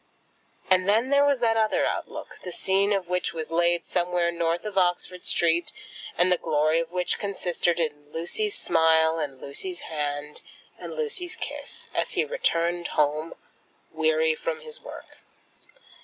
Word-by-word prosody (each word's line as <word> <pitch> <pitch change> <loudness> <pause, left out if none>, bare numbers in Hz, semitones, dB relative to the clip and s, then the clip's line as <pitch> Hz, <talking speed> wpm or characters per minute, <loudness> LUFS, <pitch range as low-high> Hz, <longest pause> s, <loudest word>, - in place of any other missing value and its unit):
And 185 +1 +4
then 230 +6 +3
there 280 0 +5
was 280 -3 +2
that 225 -1 +3
other 220 -1 +2
outlook, - - -4
the 180 - -5
scene 195 +3 +2
of 195 -3 0
which 180 -1 -1
was 160 -1 -4
laid 170 +1 +2
somewhere 175 -1 +1
north 170 +1 -1
of 210 -2 -5
Oxford 180 -1 0
Street, 170 0 +2 0.5
and 180 +1 +4
the 180 - +3
glory 155 +2 +2
of 165 0 -3
which 180 0 0
consisted 175 -3 -1
in 145 -2 -3
Lucy's 405 - -1
smile, 160 0 +3
and 140 -4 -4
Lucy's 355 - -5
hand, 150 -1 -4 0.4
and - - -7
Lucy's 380 -6 -2
kiss, - - -7
as - - 0
he - - +1
returned 175 - 0
home 150 +2 +1 0.6
weary 475 0 +2
from 480 0 -4
his 470 0 -10
work. - - -11
175 Hz, 155 wpm, -26 LUFS, 165-225 Hz, 0.6 s, there